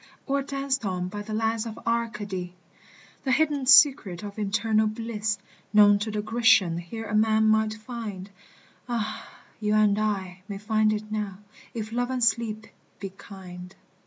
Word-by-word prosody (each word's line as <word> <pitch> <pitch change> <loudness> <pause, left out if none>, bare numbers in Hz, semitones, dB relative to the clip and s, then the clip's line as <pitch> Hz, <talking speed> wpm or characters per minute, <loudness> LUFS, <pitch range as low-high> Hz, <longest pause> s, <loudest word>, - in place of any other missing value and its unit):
Or 280 0 0
danced 275 -1 -2
on 180 -2 -2
by 205 +2 -6
the 215 +1 -5
lads 225 +1 0
of 220 - -7
Arcady! 210 -6 -2 0.7
The 265 - 0
hidden 290 -2 +1
secret 255 - +5
of 205 +1 -7
eternal 215 +1 +1
bliss 215 -1 -2 0.4
Known 205 -1 +7
to 210 +2 -3
the 210 -1 -3
Grecian 225 -7 +3
here 225 +7 -7
a 210 - -6
man 220 0 +3
might 220 0 +2
find, 215 -4 -7 0.6
Ah! 230 -3 -3 0.3
you 210 -1 +1
and 210 -1 +3
I 190 -4 -2
may 200 - -5
find 215 +1 +1
it 215 0 -4
now 210 -3 -3 0.4
if 220 -1 -4
Love 245 +1 -1
and 255 -2 -1
Sleep 225 -2 0 0.3
be 195 - -5
kind. 185 -2 -11
215 Hz, 160 wpm, -26 LUFS, 205-230 Hz, 0.7 s, Known